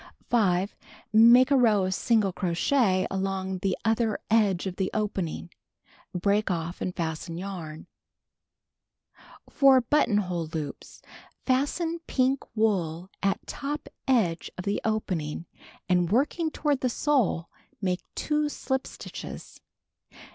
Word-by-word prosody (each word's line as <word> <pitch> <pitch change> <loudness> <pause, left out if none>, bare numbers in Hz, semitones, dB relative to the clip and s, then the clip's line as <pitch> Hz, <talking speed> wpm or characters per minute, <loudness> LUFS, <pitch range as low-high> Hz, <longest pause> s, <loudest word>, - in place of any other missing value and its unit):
5. 195 -4 +2 0.4
Make 235 +4 +7
a - - +6
row 220 -7 +4
of 185 - -1
single 215 -2 +2
crochet 185 +3 +1
along 190 -1 -2
the 190 0 -1
other 225 -1 +1
edge 205 -5 +3
of 185 -2 -4
the 190 -1 0
(jpening. 195 -5 -2 0.6
Break 200 +4 +1
ofT 170 -1 -3
and 180 - -3
fasten 165 0 -4
yarn. 175 -5 -6 1.6
For 270 -2 +5
Buttoidiole 205 - +1
Loops: 150 -3 -6 0.4
I'astcn 305 +6 0
pink 260 +1 +2 0.2
wool 185 -5 0
at 195 0 0
top 290 +1 -5 0.2
edgc^ 210 -11 +1
of 180 - -6
the 200 0 -1
opening, 180 -8 -2 0.4
and 180 -1 +2
working 295 - +1
toward 295 -3 -1
tho 255 - +2
sole, 245 - +1 0.3
make 185 -3 -1
'2 300 0 0
slij) 265 -2 -2
stitches. - - -9
200 Hz, 120 wpm, -27 LUFS, 180-255 Hz, 1.6 s, Make